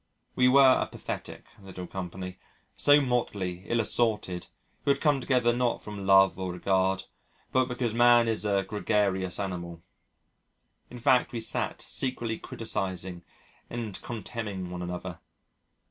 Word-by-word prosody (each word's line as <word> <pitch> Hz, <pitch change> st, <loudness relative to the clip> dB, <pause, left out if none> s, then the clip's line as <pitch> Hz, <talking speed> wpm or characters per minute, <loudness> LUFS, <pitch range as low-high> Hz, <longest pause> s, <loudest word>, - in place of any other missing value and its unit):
We 125 Hz, -, +4 dB
were 130 Hz, 0 st, +7 dB
a -, -, -1 dB
pathetic -, -, -7 dB, 0.2 s
little 95 Hz, -2 st, -8 dB
company 90 Hz, 0 st, -6 dB, 0.4 s
so 145 Hz, 0 st, +6 dB
motley, 100 Hz, -8 st, -2 dB
ill 115 Hz, -, +1 dB
assorted 105 Hz, -5 st, 0 dB, 0.4 s
who -, -, -1 dB
had 140 Hz, 0 st, +3 dB
come 145 Hz, -4 st, +2 dB
together 125 Hz, -3 st, +2 dB
not 120 Hz, 0 st, 0 dB
from 100 Hz, -2 st, -7 dB
love 95 Hz, -1 st, +6 dB
or 95 Hz, -1 st, -2 dB
regard 95 Hz, +1 st, +1 dB, 0.5 s
but 130 Hz, -1 st, +3 dB
because 125 Hz, -3 st, -2 dB
man 120 Hz, 0 st, +5 dB
is 110 Hz, -3 st, 0 dB
a 100 Hz, -2 st, +1 dB
gregarious 95 Hz, -3 st, 0 dB
animal. 85 Hz, -4 st, -5 dB, 1.1 s
In 125 Hz, -, -9 dB
fact, 125 Hz, 0 st, +3 dB
we 120 Hz, -, -3 dB
sat 110 Hz, -, -2 dB
secretly 120 Hz, -4 st, -3 dB
criticising 95 Hz, -5 st, -4 dB, 0.5 s
and 115 Hz, -4 st, -5 dB
contemning 105 Hz, -5 st, -5 dB
one 90 Hz, 0 st, -5 dB
another 90 Hz, -1 st, -5 dB
105 Hz, 135 wpm, -28 LUFS, 95-120 Hz, 1.1 s, were